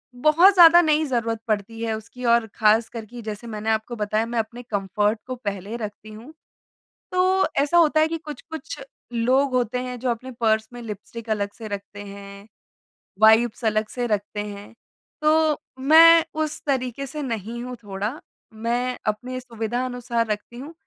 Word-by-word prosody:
बहुत 320 Hz, +9 st, +5 dB
ज़्यादा 345 Hz, -1 st, +9 dB
नहीं 310 Hz, -1 st, +2 dB
ज़रूरत 230 Hz, -4 st, -1 dB
पड़ती 220 Hz, +1 st, -2 dB
है 225 Hz, -1 st, -1 dB
उसकी 230 Hz, +3 st, -11 dB
और 235 Hz, -1 st, +4 dB
ख़ासकर 225 Hz, +1 st, +2 dB
कि 240 Hz, +2 st, -10 dB
जैसे 215 Hz, +2 st, -6 dB
मैंने 215 Hz, -1 st, -4 dB
आपको 220 Hz, +2 st, -1 dB
बताया 215 Hz, +1 st, 0 dB
मैं 235 Hz, 0 st, -2 dB
अपने 240 Hz, +3 st, -5 dB
कम्फ़र्ट 210 Hz, 0 st, -1 dB
को 255 Hz, -, -4 dB
पहले 205 Hz, -2 st, -5 dB
रखती 215 Hz, -1 st, -7 dB
हूँ। 235 Hz, +8 st, -12 dB, 0.8 s
तो 370 Hz, +1 st, +3 dB, 0.2 s
ऐसा 320 Hz, +4 st, +2 dB
होता 315 Hz, -2 st, +5 dB
है 315 Hz, -, +4 dB
कि 330 Hz, 0 st, -3 dB
कुछ-कुछ 320 Hz, -, -8 dB, 0.3 s
लोग 260 Hz, +4 st, +2 dB
होते 250 Hz, 0 st, 0 dB
हैं 250 Hz, 0 st, -5 dB
जो 250 Hz, 0 st, -1 dB
अपने 255 Hz, +3 st, -6 dB
पर्स 220 Hz, -1 st, +2 dB
में 240 Hz, -, -8 dB
लिपस्टिक 225 Hz, +1 st, -8 dB
अलग 205 Hz, -2 st, -1 dB
से 225 Hz, -2 st, -7 dB
रखते 205 Hz, 0 st, -7 dB
हैं, 200 Hz, 0 st, -11 dB, 0.7 s
वाइप्स 225 Hz, +1 st, +5 dB
अलग 215 Hz, 0 st, +1 dB
से 245 Hz, -1 st, -1 dB
रखते 210 Hz, -1 st, -2 dB
हैं, 205 Hz, +1 st, -9 dB, 0.5 s
तो 310 Hz, 0 st, +3 dB, 0.2 s
मैं 325 Hz, +4 st, +8 dB, 0.2 s
उस 305 Hz, 0 st, -5 dB
तरीके 260 Hz, -1 st, -1 dB
से 300 Hz, +3 st, -6 dB
नहीं 230 Hz, -1 st, -4 dB
हूँ 250 Hz, 0 st, -6 dB
थोड़ा 205 Hz, +7 st, -4 dB, 0.3 s
मैं 240 Hz, +3 st, -2 dB
अपनी 250 Hz, +4 st, -2 dB
सुविधा 240 Hz, 0 st, -3 dB
अनुसार 240 Hz, -2 st, -2 dB
रखती 210 Hz, +3 st, -5 dB
हूँ 295 Hz, +5 st, -9 dB
235 Hz, 165 wpm, -23 LUFS, 215-260 Hz, 0.8 s, ज़्यादा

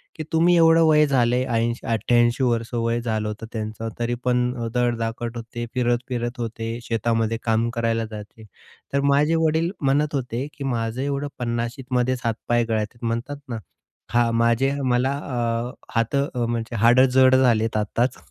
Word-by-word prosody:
की 155 Hz, -, -5 dB
"तुम्ही 170 Hz, +2 st, +4 dB
एवढं 165 Hz, 0 st, +6 dB
वय 150 Hz, -1 st, +5 dB
झालंय," 125 Hz, -2 st, +2 dB
80-88 120 Hz, +1 st, +1 dB
वर्ष 115 Hz, -1 st, 0 dB
वय 115 Hz, 0 st, 0 dB
झालं 110 Hz, -2 st, -2 dB
होतं 105 Hz, +1 st, -6 dB
त्यांचं, 110 Hz, 0 st, -4 dB
तरी 120 Hz, +1 st, -1 dB
पण 125 Hz, 0 st, +1 dB, 0.2 s
धडधाकट 120 Hz, -1 st, -1 dB
होते. 120 Hz, +1 st, -6 dB
फिरत-फिरत 120 Hz, 0 st, -1 dB
होते, 115 Hz, 0 st, -4 dB
शेतामध्ये 115 Hz, -1 st, 0 dB
काम 115 Hz, 0 st, +1 dB
करायला 115 Hz, -1 st, 0 dB
जायचे. 105 Hz, +1 st, -10 dB, 0.5 s
तर 140 Hz, -, +2 dB
माझे 150 Hz, +4 st, +3 dB
वडील 160 Hz, +2 st, +1 dB
म्हणत 145 Hz, +2 st, +1 dB
होते 125 Hz, -1 st, -2 dB
की 140 Hz, -, -8 dB
"माझं 120 Hz, -2 st, -2 dB
एवढं 140 Hz, +1 st, -2 dB
पन्नाशीतमध्ये 125 Hz, +1 st, -1 dB
हातपाय 120 Hz, +1 st, 0 dB
गळतात 110 Hz, +2 st, -2 dB
म्हणतात 115 Hz, +5 st, -2 dB
ना. 115 Hz, -, -3 dB, 0.6 s
हा, 120 Hz, 0 st, +3 dB
माझे 115 Hz, +3 st, +2 dB
मला 125 Hz, +2 st, +2 dB
अ, 120 Hz, -3 st, -2 dB, 0.2 s
हात 115 Hz, +3 st, +1 dB, 0.3 s
म्हणजे 115 Hz, 0 st, -3 dB
हाडं 120 Hz, +4 st, +5 dB
जड 130 Hz, 0 st, +6 dB
झालेत 115 Hz, -4 st, +2 dB
आत्ताच." 115 Hz, +4 st, 0 dB
120 Hz, 145 wpm, -23 LUFS, 115-130 Hz, 0.6 s, एवढं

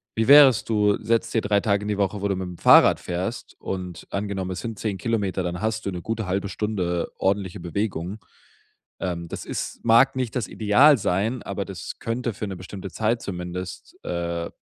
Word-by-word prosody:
Wie 115 Hz, 0 st, +1 dB
wär's, 140 Hz, -4 st, +8 dB
du 105 Hz, -2 st, +2 dB
setzt 115 Hz, 0 st, 0 dB
dir 115 Hz, -, +2 dB
3 100 Hz, -1 st, +2 dB
Tage 100 Hz, 0 st, 0 dB
die 105 Hz, -1 st, -1 dB
Woche, 100 Hz, 0 st, -1 dB
wo 100 Hz, -, 0 dB
du 100 Hz, -, 0 dB
mit 95 Hz, 0 st, -4 dB
dem 90 Hz, -1 st, -8 dB
Fahrrad -, -, +6 dB
fährst, 90 Hz, +7 st, -4 dB
und 90 Hz, -3 st, -6 dB
angenommen, 100 Hz, -2 st, -3 dB
es 95 Hz, -, -4 dB
sind 115 Hz, -3 st, -6 dB
10 105 Hz, -3 st, -2 dB
Kilometer, 100 Hz, -3 st, -1 dB
dann 90 Hz, +1 st, -3 dB
hast 110 Hz, 0 st, -2 dB
du 100 Hz, -, -1 dB
'ne 90 Hz, -1 st, -5 dB
gute 110 Hz, +3 st, -3 dB
halbe 95 Hz, +2 st, -1 dB
Stunde 90 Hz, -5 st, -2 dB
ordentliche 95 Hz, 0 st, 0 dB
Bewegung. 90 Hz, +1 st, -3 dB, 0.8 s
Ähm, 85 Hz, -2 st, -3 dB
das -, -, -6 dB
ist -, -, -5 dB
mag 120 Hz, +4 st, +5 dB
nicht 125 Hz, -3 st, -2 dB
das 125 Hz, -4 st, -1 dB
Ideal 125 Hz, +8 st, +5 dB
sein, 105 Hz, +4 st, -1 dB
aber 100 Hz, 0 st, -3 dB
das 95 Hz, -2 st, -8 dB
könnte 115 Hz, 0 st, -2 dB
für 105 Hz, +1 st, -5 dB
'ne 95 Hz, -, -5 dB
bestimmte 95 Hz, +1 st, -8 dB
Zeit 110 Hz, +6 st, 0 dB
zumindest, 90 Hz, 0 st, -6 dB
äh, 85 Hz, -1 st, -3 dB
100 Hz, 195 wpm, -24 LUFS, 90-110 Hz, 0.8 s, wär's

